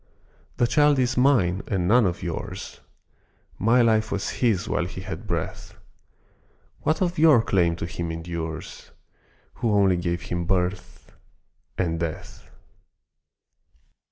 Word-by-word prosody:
The 120 - +3
child 145 +3 +3
is 130 0 +1
mine 115 -9 +3
and 90 -3 -1
none 115 0 +5
of 85 - -4
yours, 85 -2 -6 0.8
My 120 +4 +4
life 110 -1 +2
was 100 - -2
his 110 -4 +2
while 90 - 0
he 90 +1 -7
had 105 +3 -7
breath, 85 -4 -4 1.0
What 155 +4 0
of 175 -3 -2
your 150 -8 +6
claim 85 -6 +2
to 85 - -5
him 85 -1 -4
endures, 80 -1 -6 0.7
Who 115 -3 +1
only 100 -3 +3
gave 85 0 -2
him 85 0 -3
birth 90 0 -2 0.7
and 85 -3 -1
death? 80 -2 -6
95 Hz, 130 wpm, -24 LUFS, 85-120 Hz, 1.0 s, your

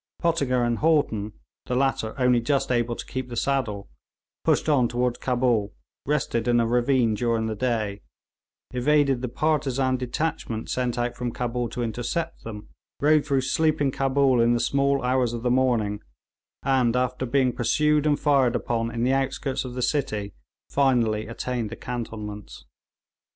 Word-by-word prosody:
Pottinger 140 -8 +1
and 120 -1 0
Haughton, 130 -10 +1 0.3
the 125 - -1
latter 130 -4 0
only 125 -2 +3
just 135 +2 0
able 120 -1 +1
to - - -7
keep 130 -1 -5
the 120 - -6
saddle, 115 -6 -1 0.6
pushed - - +2
on 135 -6 +3
toward 125 +1 -1
Cabul, 120 -5 +1 0.3
rested 130 -5 0
in 120 -1 +4
a 115 - +2
ravine 120 0 +2
during 115 0 0
the 110 - -2
day, 110 -3 -2 0.7
evaded 135 0 +2
the 125 - -3
partisan 135 -2 0
detachment 125 -3 -3
sent 125 -1 -1
out 120 0 -1
from 125 -1 -3
Cabul 120 0 -2
to 120 - -3
intercept 120 +9 -3
them, 105 -2 -8 0.3
rode 150 +1 +4
through 135 -3 +2
sleeping 145 +1 +1
Cabul 135 -2 +2
in 120 +1 +4
the - - 0
small 140 +1 +1
hours 125 -1 +1
of 120 -1 -5
the 125 - +1
morning, 120 -5 +1 0.6
and 130 -3 +2
after 125 0 -1
being 130 0 +2
pursued 150 +5 +2
and 145 -1 +2
fired 135 -5 +3
upon 115 -1 -1
in 115 0 -3
the 130 +2 +2
outskirts 135 0 -1
of 125 -1 -7
the 125 - -2
city, 110 -7 -1 0.3
finally 120 -6 +1
attained 120 -1 -3
the - - -6
cantonments. 105 - -7
125 Hz, 160 wpm, -25 LUFS, 115-135 Hz, 0.7 s, in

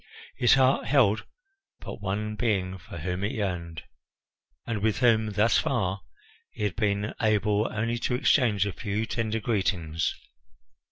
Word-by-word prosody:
His 120 +2 +5
heart 130 0 +3
held 110 -6 +3 0.5
but - - -8
one 105 +2 -2
being 95 -5 -1
for 85 -1 -10
whom 90 +4 -3
it 100 - -1
yearned, 90 -6 -3 0.8
and 115 -3 -3
with 110 0 +1
whom 110 -3 +3
thus 105 +2 +3
far 100 -6 -1 0.5
he - - -7
had 105 -4 -1
been 105 0 0
able 105 0 +2
only 115 +2 -1
to 125 - -1
exchange 125 -6 +3
a 100 - -3
few 105 +2 -2
tender 115 -1 -2
greetings. 95 -8 -1
105 Hz, 145 wpm, -27 LUFS, 95-115 Hz, 0.8 s, His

